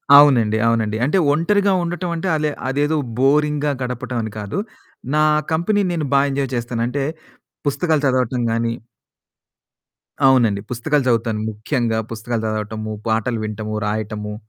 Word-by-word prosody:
అవునండి. 120 -7 +6
అవునండి. 110 -2 +1
అంటే 170 +7 +2
ఒంటరిగా 195 +6 +2
ఉండటం 175 +1 -3
అంటే 170 +3 -3
అలే 150 -1 0 0.2
అదేదో 145 +3 +1 0.2
బోరింగ్‌గా 150 +2 +2
గడపటం 125 0 -3
అని 110 - -5
కాదు. 105 - -3 0.6
నా 155 - +4 0.3
కంపెనీ 175 +6 +1
నేను 160 -4 -1
బా 140 - +6
ఎంజాయ్ 135 -1 -2
చేస్తాను. 120 0 -2
అంటే 135 +2 -2 0.6
పుస్తకాలు 155 +2 +1
చదవటం 125 -1 +1
గాని 115 0 0 1.5
అవునండి. 115 -7 +4
పుస్తకాలు 145 +4 0
చదువుతాను 115 -2 +1
ముఖ్యంగా 115 +1 -1
పుస్తకాలు 115 0 -3
చదవటము, 110 0 -3 0.2
పాటలు 110 +1 0
వింటము, 110 0 -4
రాయటము, 105 0 -3
125 Hz, 130 wpm, -20 LUFS, 110-150 Hz, 1.5 s, అవునండి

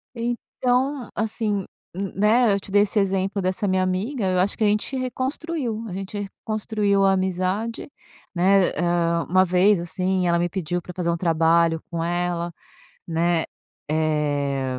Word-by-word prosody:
Então, 245 +2 -1
assim, 210 -2 -1 0.3
n 195 +2 -4
né, 215 +3 +4
eu 200 - +1
te 195 - -12
dei 205 +1 +5
esse 210 +1 0
exemplo 195 0 0
dessa 185 +2 -1
minha 185 -1 +2
amiga, 195 +6 -1
eu 185 -1 +1
acho 190 +2 +1
que - - 0
a - - +4
gente 210 +6 0
reconstruiu, 255 -1 -3
a 190 - -6
gente 195 +2 -5
reconstruiu 205 0 -1
a 195 - +5
amizade, 190 +6 -1 0.4
né? 190 +1 +4
Eh - - -7
hã, 170 -1 +1
uma 185 +2 +5
vez, 185 +2 +4
assim, 180 +2 -1
ela 170 0 +2
me 175 +1 0
pediu 175 -1 -2
para 180 - -9
fazer 175 -1 -2
um 170 - +1
trabalho 165 -1 +2
com 165 -1 -2
ela, 175 0 -1 0.6
né, 170 0 +1 0.5
eh, 145 -4 0
190 Hz, 160 wpm, -23 LUFS, 170-210 Hz, 0.6 s, dei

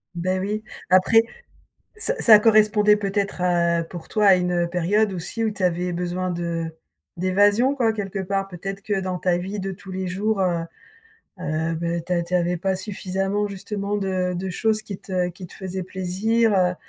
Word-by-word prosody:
Beh 185 +2 -1
oui. 210 +3 -3 0.3
Après, 185 +5 +6 0.8
ç 445 +3 +1
ça 220 -3 +8
correspondait 210 -1 +5
peut-être 200 -2 -2
à, 170 -1 +2
pour 170 -1 -10
toi, 210 -1 +2
à 195 - +8
une 180 -1 0
période 195 +4 +1
aussi 185 +6 -3
où 220 - +1
tu 200 -2 -7
avais 180 0 0
besoin 180 +1 -2
de 170 -1 -2 0.5
d'évasion, 205 +8 +3
quoi, 230 -4 +2
quelque 200 -2 -4
part? 195 +1 -2
Peut-être 195 +2 -6
que 200 -1 -1
dans 185 -1 -3
ta 180 -1 +1
vie 195 +4 -5
de 195 +1 -3
tous 190 +1 -11
les 185 0 -3
jours, 200 +2 -1
heu 175 -3 +1 0.8
heu, 160 0 -1
beh 170 0 -2
tu 180 - -2
a 175 - +2
tu 175 +2 -4
avais 175 0 +1
pas 190 +1 0
suffisamment 195 +1 -2
justement 200 +1 -4
de 185 -2 -1
de 185 +2 -3
choses 215 +3 +1
qui 200 -3 -7
te 180 -2 -2
qui 180 +1 -10
te - - -12
faisaient 190 0 -5
plaisir, 200 +5 0
heu, 180 -1 +2
190 Hz, 185 wpm, -23 LUFS, 180-205 Hz, 0.8 s, ça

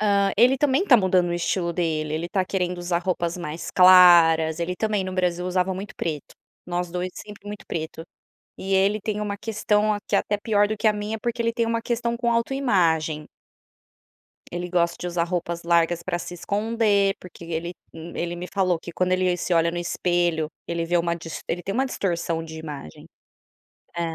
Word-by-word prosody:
hã, 200 -2 +2
ele 250 +5 +5
também 290 +6 +2
tá 265 - +7
mudando 185 -4 +2
o - - -2
estilo 175 0 -1
dele. 155 -3 -1
Ele 170 +2 -3
tá 190 -1 0
querendo 180 -1 -2
usar 175 0 -1
roupas 170 -1 -2
mais 165 -2 -6
claras, 170 -3 +7
ele 175 +2 -1
também 210 -3 0
no 185 - -4
Brasil 180 -1 0
usava 185 +1 0
muito 195 +2 -7
preto. 150 -4 -4 0.3
Nós 175 -1 -2
2 180 +1 -3
sempre 210 -1 -11
muito 205 0 -8
preto 160 0 -5 0.5
e 195 - -4
ele 200 +3 +3
tem 210 +1 -3
uma 205 -1 -3
questão 215 0 +1
aqui 205 - -4
até 205 - +1
pior 205 0 +2
do 215 - -2
que 220 - -1
a 215 - +6
minha 210 +1 -4
porque 235 +1 -2
ele 230 - 0
tem 230 0 0
uma 230 0 -1
questão 235 0 -1
com 235 0 0
autoimagem. 175 - +1 1.2
Ele 175 +1 -4
gosta 170 -1 +1
de 180 - -4
usar 175 -1 0
roupas 170 -1 -3
largas 170 0 +2
para 180 -2 -2
se 175 +1 -7
esconder 205 +1 +1
porque 175 -2 -12
ele 170 +1 -4 0.2
ele 170 +1 -5
me 175 +1 -6
falou 185 -4 0
que 170 - -9
quando 185 +2 0
ele 185 -1 +2
se 180 - -1
olha 165 0 +3
no 175 - -4
espelho 175 -2 0 0.2
ele 170 0 -2
vê 175 +1 +2
uma 170 0 0
ele 170 - -7
dist 160 0 -7 0.2
tem 195 - -3
uma 265 +3 +1
distorção 170 -8 -2
de 160 0 -9
imagem. 145 - -9 0.9
É, 170 - -2
180 Hz, 195 wpm, -24 LUFS, 170-205 Hz, 1.2 s, tá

